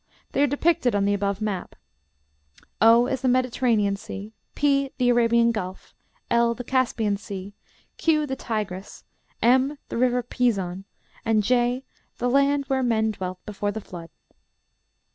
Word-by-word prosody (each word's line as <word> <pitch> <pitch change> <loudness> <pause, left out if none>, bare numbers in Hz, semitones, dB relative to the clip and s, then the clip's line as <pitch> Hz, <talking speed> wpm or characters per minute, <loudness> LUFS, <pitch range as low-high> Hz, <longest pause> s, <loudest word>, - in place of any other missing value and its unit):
They - - 0
are 290 - +5
depicted 285 -4 +1
on 200 -1 +2
the 200 - +2
above 200 0 -1
map: 205 -4 -3 1.1
O 230 +2 +7
is 260 0 -2
the 260 - 0
Mediterranean 245 -5 +2
Sea; 200 +2 -8 0.2
P, 275 -1 +2
the 250 -1 +2
Arabian 235 -1 +4
Gulf; 190 -4 -6 0.4
L, 235 0 +3
the 245 - -6
Caspian 235 -5 0
Sea; 200 -1 -8 0.4
Q, 305 -2 +2
the 265 -2 -3
Tigris; 210 -6 -5 0.4
M, 260 +4 +3
the - - -4
river 250 0 +2
Pison; 195 -7 -1 0.4
"and 220 -2 +2
J, 245 +3 +1 0.3
the 245 0 0
land 280 +1 +3
where 265 0 0
men 220 -3 +1
dwelt 185 -3 -6
before 205 -1 -3
the 220 - -5
Flood." 170 -5 -10
235 Hz, 145 wpm, -24 LUFS, 205-255 Hz, 1.1 s, O